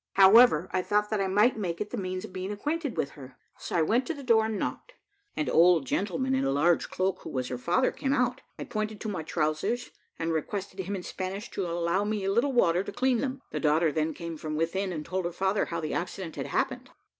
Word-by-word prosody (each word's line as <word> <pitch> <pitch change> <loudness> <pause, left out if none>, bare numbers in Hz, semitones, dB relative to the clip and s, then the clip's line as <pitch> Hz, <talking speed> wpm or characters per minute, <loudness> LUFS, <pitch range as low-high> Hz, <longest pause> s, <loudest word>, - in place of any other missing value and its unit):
However, 195 -3 +7
I 185 - +1
thought 210 +3 0
that 215 -2 +1
I 195 - +1
might 210 +5 +3
make 170 -4 -3
it 210 0 -4
the - - -3
means 185 -2 -3
of - - -12
being 185 +2 -4
acquainted 290 +6 -3
with - - -1
her, 130 -3 -12 0.2
so - - -5
I 165 - +4
went 235 +10 +1
to 330 - -2
the 280 - -9
door 225 -3 +4
and 220 -1 -2
knocked. - - -4 0.4
An 305 - 0
old 170 -3 +5
gentleman 215 - -1
in 265 - +1
a - - +1
large 160 +5 +2
cloak, 185 0 -1
who - - -8
was 130 -2 -3
her 125 - -3
father, 175 - +2
came 270 - -2
out; 250 -2 +1 0.2
I - - -5
pointed 215 -2 -3
to 220 - -3
my 185 -5 -3
trowsers, 155 +10 -1 0.3
and 165 0 -1
requested 190 +4 -4
him 190 +2 -3
in 185 - -5
Spanish 190 +3 -5
to 190 - -2
allow 170 +3 0
me 210 -1 -2
a 195 - +1
little 235 +7 +2
water 180 -8 +3
to - - -6
clean 255 -1 +1
them. 265 +1 -3
The - - -2
daughter 155 +1 +3
then 155 +1 -1
came 170 -1 -6
from 155 0 -4
within, 185 +5 -1
and 155 -3 -5
told 185 -1 -2
her 175 - -1
father 190 +3 0
how 170 - -4
the 155 -2 -3
accident 175 -1 -4
had - - -4
happened. - - -1
190 Hz, 245 wpm, -28 LUFS, 170-220 Hz, 0.4 s, However